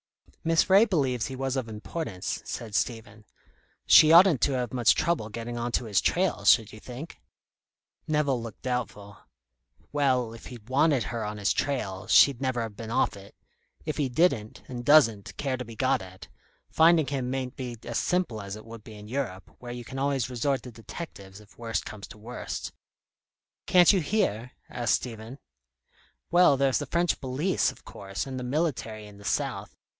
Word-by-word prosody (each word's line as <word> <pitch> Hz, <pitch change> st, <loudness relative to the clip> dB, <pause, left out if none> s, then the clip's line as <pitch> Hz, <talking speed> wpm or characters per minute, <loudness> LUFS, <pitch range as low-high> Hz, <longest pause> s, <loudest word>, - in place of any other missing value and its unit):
"Miss 165 Hz, 0 st, +3 dB
Ray 200 Hz, +4 st, +7 dB
believes 135 Hz, -, 0 dB
he 135 Hz, -, -6 dB
was 135 Hz, 0 st, -2 dB
of 130 Hz, -4 st, -3 dB
importance," 105 Hz, -, -5 dB
said 115 Hz, -3 st, -6 dB
Stephen. 110 Hz, -1 st, -3 dB, 0.6 s
"She 155 Hz, -, +8 dB
oughtn't 170 Hz, -, +7 dB
to 140 Hz, -, +2 dB
have 125 Hz, -1 st, -2 dB
much 120 Hz, -4 st, +4 dB
trouble 155 Hz, -10 st, 0 dB
getting 115 Hz, +2 st, -6 dB
on 120 Hz, +1 st, -2 dB
to 125 Hz, -, 0 dB
his 105 Hz, -3 st, +1 dB
trail, 180 Hz, -, 0 dB
should 105 Hz, +3 st, +5 dB
you 110 Hz, -, -10 dB
think?" 130 Hz, +8 st, -9 dB, 0.9 s
Nevill 145 Hz, -5 st, +1 dB
looked 115 Hz, -3 st, -9 dB
doubtful. 115 Hz, -5 st, -4 dB, 0.7 s
"Well, 130 Hz, -5 st, +1 dB
if 115 Hz, -, -11 dB
he'd 115 Hz, -4 st, -11 dB
wanted 140 Hz, -1 st, +3 dB
her 115 Hz, +2 st, -4 dB
on 105 Hz, 0 st, -4 dB
his 105 Hz, -1 st, +1 dB
trail, 105 Hz, -8 st, -2 dB
she'd 130 Hz, +2 st, +5 dB
never 130 Hz, -3 st, -1 dB
have 110 Hz, -2 st, -7 dB
been 110 Hz, 0 st, -8 dB
off 115 Hz, -, +1 dB
it. 100 Hz, 0 st, -14 dB, 0.5 s
If 155 Hz, -, -3 dB
he 145 Hz, -4 st, 0 dB
didn't, 120 Hz, -7 st, 0 dB
and 120 Hz, -1 st, -6 dB
doesn't, 120 Hz, -8 st, +4 dB
care 135 Hz, -2 st, -2 dB
to 125 Hz, -, -5 dB
be 115 Hz, -1 st, -11 dB
got -, -, +1 dB
at, 95 Hz, -1 st, -11 dB, 0.4 s
finding 160 Hz, -1 st, +5 dB
him 135 Hz, -3 st, -3 dB
mayn't 130 Hz, 0 st, -3 dB
be 125 Hz, -3 st, -6 dB
as 120 Hz, -1 st, -2 dB
simple 175 Hz, -, -1 dB
as 100 Hz, 0 st, -6 dB
it 110 Hz, -, -11 dB
would 115 Hz, -1 st, -11 dB
be 110 Hz, -, -11 dB
in 105 Hz, 0 st, -11 dB
Europe, 115 Hz, -6 st, -5 dB
where 120 Hz, -1 st, -8 dB
you 120 Hz, -1 st, -7 dB
can 135 Hz, -, -7 dB
always 135 Hz, -3 st, 0 dB
resort 130 Hz, +3 st, -1 dB
to 125 Hz, -, -9 dB
detectives 110 Hz, -, -9 dB
if 105 Hz, +2 st, -20 dB
worst 115 Hz, -4 st, -2 dB
comes 105 Hz, -1 st, -8 dB
to -, -, -13 dB
worst." 120 Hz, +4 st, -6 dB, 1.0 s
"Can't 180 Hz, +1 st, +6 dB
you 190 Hz, -, +2 dB
here?" 140 Hz, -, -1 dB, 0.2 s
asked 120 Hz, -3 st, +1 dB
Stephen. 115 Hz, +1 st, -7 dB, 0.9 s
"Well, 175 Hz, -5 st, +5 dB
there's 135 Hz, -1 st, +2 dB
the 145 Hz, -, -5 dB
French 170 Hz, +3 st, 0 dB
police, 140 Hz, +8 st, 0 dB
of -, -, -19 dB
course, 95 Hz, -1 st, -6 dB
and 130 Hz, -1 st, -5 dB
the -, -, -5 dB
military 125 Hz, -6 st, -2 dB
in 100 Hz, -1 st, -14 dB
the -, -, -13 dB
south. -, -, -2 dB
125 Hz, 185 wpm, -27 LUFS, 110-140 Hz, 1.0 s, She